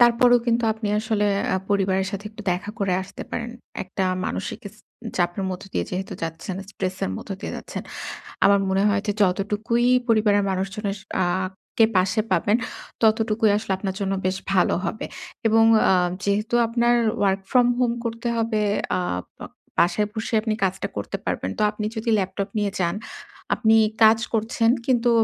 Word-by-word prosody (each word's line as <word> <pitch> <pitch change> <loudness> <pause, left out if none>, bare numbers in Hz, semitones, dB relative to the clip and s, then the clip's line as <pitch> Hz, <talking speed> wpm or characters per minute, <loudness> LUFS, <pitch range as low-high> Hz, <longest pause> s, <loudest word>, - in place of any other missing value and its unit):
তারপরেও 240 +1 +6
কিন্তু 235 0 +2
আপনি 220 -1 -4
আসলে 215 -1 0 0.3
আ - - +3
পরিবারের 190 -1 +2
সাথে 200 +1 -5
একটু 215 0 -10
দেখা 190 +3 -4
করে 195 -2 0
আসতে 185 - -9
পারেন। 235 0 -3 0.3
একটা 190 +1 -3 0.2
মানসিক 190 - -4
ইস 205 - -19 0.4
চাপের 175 +2 0
মধ্য 185 +1 -5
দিয়ে - - 0
যেহেতু 185 +1 -4
যাচ্ছেন, 165 +3 -4
স্ট্রেসের 185 - -3
মধ্য - - -9
দিয়ে - - -5
যাচ্ছেন। - - -6 0.6
আমার 200 0 +6
মনে 190 +1 +2
হয় 200 -1 +2
যে 205 - +1
যতটুকুই 210 +5 +1 0.2
পরিবারের 210 -3 +3
মানুষজনের 195 +2 -2 0.3
আ - - +3 0.5
কে 225 - +8
পাশে 185 +4 +2
পাবেন, 220 0 +3 0.5
ততটুকুই 220 0 +3
আসলে 210 -2 -2
আপনার 190 -1 -3
জন্য 195 -1 0
বেশ 185 0 0 0.2
ভালো 185 - +3
হবে। 220 - -3 0.4
এবং 225 0 +5 0.3
আ - - +6 0.3
যেহেতু 210 +3 0
আপনার 235 +1 +2 0.3
ওয়ার্ক 195 -1 +2
ফ্রম 245 -1 +5
হোম 245 -2 +2
করতে 230 +1 -3
হবে, 225 -2 0 0.3
আ - - 0 0.4
বা - - -7 0.3
বাসায় 205 +4 +3
বসে 225 +1 -4
আপনি 220 -1 0
কাজটা 190 0 -1
করতে 100 - -3
পারবেন। 95 - -2
তো - - +1
আপনি 210 0 -4
যদি 230 +1 -1
ল্যাপটপ 195 +1 -2
নিয়ে 205 -2 0
যান, 170 -1 +1 0.6
আপনি 225 -2 +4 0.3
কাজ 220 +1 +7 0.2
করছেন 225 +1 +2 0.2
কিন্তু 240 -2 +3
210 Hz, 165 wpm, -23 LUFS, 190-225 Hz, 0.6 s, কে